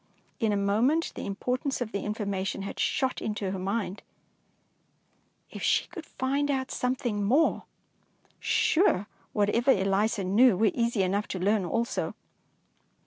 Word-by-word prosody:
In 225 -3 +1
a 205 - +1
moment 225 +11 +2
the - - -5
impor 250 +6 -2
tance 280 -2 -2
of 240 -3 -3
the 200 - -2
information 200 -2 -3
had 200 - -6
shot 260 -1 0
into 210 -3 -2
her 190 - -4
mind! 200 +1 -2 1.5
If - - -8
she - - +2
could - - -9
find 280 +2 -1
out 265 -1 -1
some 250 +1 0
thing 215 -5 -2
more! 270 +11 +2 0.7
Sure, 315 - +2 0.3
whatever 210 +5 +1
Eliza 200 0 +2
knew 205 +3 +4
were 215 0 +3
easy 235 -4 +1
enough 200 +3 0
to 185 - -4
learn 200 +1 +2
also. 235 +8 -2
215 Hz, 145 wpm, -28 LUFS, 200-250 Hz, 1.5 s, knew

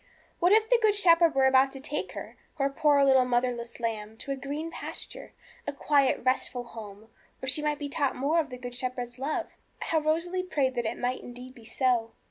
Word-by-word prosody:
What 355 +2 +4
if 435 +1 +5
the - - +4
Good 430 -2 +4
Shepherd 335 -5 +5
were 270 0 +4
about 265 0 +5
to 270 - -8
take 295 +2 -4
her, - - -8 0.2
His 275 -1 +1
poor 285 -2 +4
little 265 -1 +5
motherless 240 -1 -1
lamb, 220 -2 -3
to 275 +4 -6
a - - 0
green 290 +5 -5
pasture, - - -6 0.3
a - - 0
quiet, 280 -2 +2
restful 255 -1 0
home, 220 -2 -11 0.3
where 265 - -6
she 275 +3 +1
might 300 -1 0
be 290 -1 -4
taught 280 -1 -1
more 295 +6 +1
of 300 -3 -1
the 250 - -7
Good 245 0 -7
Shepherd's 250 0 -5
love? 310 +5 -2 0.3
How 320 - +1
Rosalie 335 +4 0
prayed 285 -8 0
that 240 -2 -1
it - - -3
might 250 +1 -2
indeed 250 +1 -10
be 235 -4 -16
so! 235 -1 0
270 Hz, 210 wpm, -28 LUFS, 245-300 Hz, 0.3 s, if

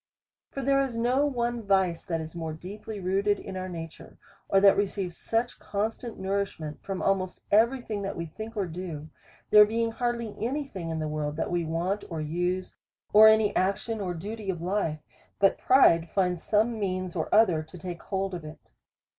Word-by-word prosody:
For 275 - -5
there 275 +1 +3
is 260 -4 -2
no 255 +5 +2
one 240 -3 -1
vice 190 -5 +1
that 165 -2 -1
is 160 0 -8
more 165 -2 -4
deeply 200 +6 -8
rooted 195 +2 +1
in 190 - -8
our 185 0 -4
nature, 165 -2 -9 0.3
or 195 - +5
that 195 0 +7
receives 195 -3 -2
such 230 +2 -2
constant 220 +3 -3
nourish 195 -1 -2
ment 155 -1 -7
from 195 -2 -4
almost 185 -2 0
every 235 +5 +4
thing 210 -3 -4
that 195 0 -3
we 170 - -4
think 220 +7 -8
or 200 - +1
do. 160 -3 -7 0.2
— - - -29
There 210 0 +10
being 230 +2 0
hardly 235 -2 -2
any 280 +4 -1
thing 185 -9 -6
in 160 - -2
the 155 -1 -2
world 150 -1 -3
that 165 - -2
we 175 -1 0
want 175 +6 -1
or 165 -2 -4
use, 175 +4 -2 0.4
or 215 +1 +10
any 220 -1 +4
action 200 +4 0
or 180 -2 -2
duty 205 +4 -6
of 180 -3 -2
life, 175 -3 -1 0.4
but 195 -1 +3
pride 170 -11 +5
finds 180 -3 0
some 220 +2 +1
means 185 -2 -2
or 160 - -2
other 195 -8 +5
to 155 +3 -12
take 175 0 -7
hold 195 -1 -2
of 175 -3 -5
it. 155 0 -12
195 Hz, 195 wpm, -27 LUFS, 170-220 Hz, 0.4 s, There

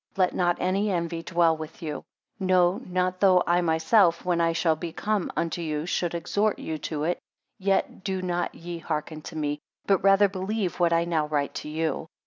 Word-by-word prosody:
Let 185 -1 +3
not 175 -1 +1
any 195 +3 +1
envy 170 -2 -1
dwell 170 -1 +2
with 155 +1 -9
you; 150 -2 -4 0.4
no, 185 0 +3
not 185 0 0
though 185 -2 +5
I 175 +1 +3
myself, 170 +3 +3
when 175 -1 +1
I 165 0 +3
shall 165 -1 +2
be 165 +1 -5
come 210 +1 -1
unto 170 +1 -1
you, 155 -1 -2
should 175 -1 -1
exhort 205 +5 0
you 155 -1 -5
to 150 -2 -2
it, 175 +3 0 0.4
yet 195 -1 0
do 190 -1 -2
not 175 -1 -2
ye 170 0 -7
hearken 155 -1 -4
to 160 - -9
me; 150 -1 -2 0.3
but 195 -3 +2
rather 195 +1 +6
believe 195 0 -3
what 170 -1 +3
I 170 0 +3
now 160 -3 0
write 145 -2 -1
to - - -7
you. 160 0 -2
175 Hz, 195 wpm, -26 LUFS, 160-185 Hz, 0.4 s, rather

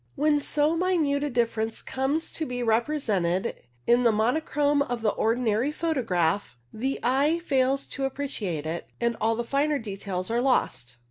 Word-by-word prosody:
When 295 0 +3
so 300 +3 +2
minute 325 -5 +1
a 295 - 0
difference 230 -2 -1
comes 270 +5 -1
to 315 - -3
be 245 -1 -3
represented 220 - 0 0.3
in 240 +1 +4
the 235 -2 +4
monochrome 285 +6 +1
of 245 -4 -2
the 215 - +3
ordinary 230 +3 +1
photograph, 205 - 0 0.2
the 265 +5 -2
eye 280 +6 +3
fails 270 -1 +1
to 275 - -2
appreciate 225 - -3
it, 165 +2 -4
and 235 -1 +1
all 225 +1 +2
the 235 - -2
finer 285 +4 +1
details 195 -4 -4
are 235 +1 +1
lost. 130 - 0
245 Hz, 155 wpm, -26 LUFS, 220-285 Hz, 0.3 s, in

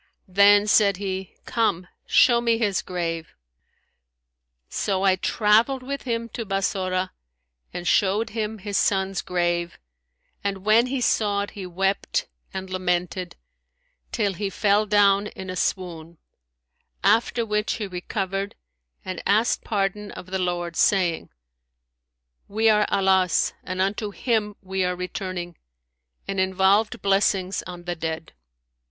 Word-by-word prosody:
Then 200 +2 +6
said 205 -2 +4
he, 190 -1 -4
Come, 205 -6 0 0.2
show 240 -2 +5
me 230 -1 +2
his 210 -4 0
grave.' 165 -3 -4 1.3
So, 195 -1 -1
I 190 -1 +4
travelled 225 +7 +2
with 280 +2 -5
him 230 -2 -2
to 230 - -5
Bassorah 190 -2 -1 0.6
and 175 0 -5
showed 205 +3 +2
him 220 0 -3
his 200 0 -3
son's 190 -1 +1
grave; 175 -1 -1 0.7
and 200 -1 -3
when 225 +3 +5
he 260 0 -2
saw 205 -3 +2
it, 205 - -7
he 195 -3 -7
wept 195 - -1 0.2
and 190 0 -5
lamented, 180 -1 -2 0.8
till 205 -4 0
he 200 +2 -3
fell 205 +2 +2
down 205 -1 +4
in 190 -2 -7
a - - -5
swoon; 170 -3 -3 0.9
after 230 +3 +3
which 210 0 0
he 215 - -3
recovered 195 +1 -3 0.5
and 185 -2 -5
asked 215 +4 +2
pardon 205 0 -1
of - - -9
the 190 - -1
Lord, 175 -2 -2
saying, 180 -4 +2 1.2
We 220 +2 +2
are 210 -1 +4
Allah's 190 -2 +2
and 185 0 -5
unto 205 +3 0
Him 210 -1 -1
we 190 0 -1
are 180 0 0
returning!'; 180 -1 -5 0.7
and 195 -1 -2
involved 190 +3 +2
blessings 195 -1 +2
on 175 -1 -8
the 175 0 -3
dead. 160 0 -5
195 Hz, 130 wpm, -24 LUFS, 185-210 Hz, 1.3 s, Then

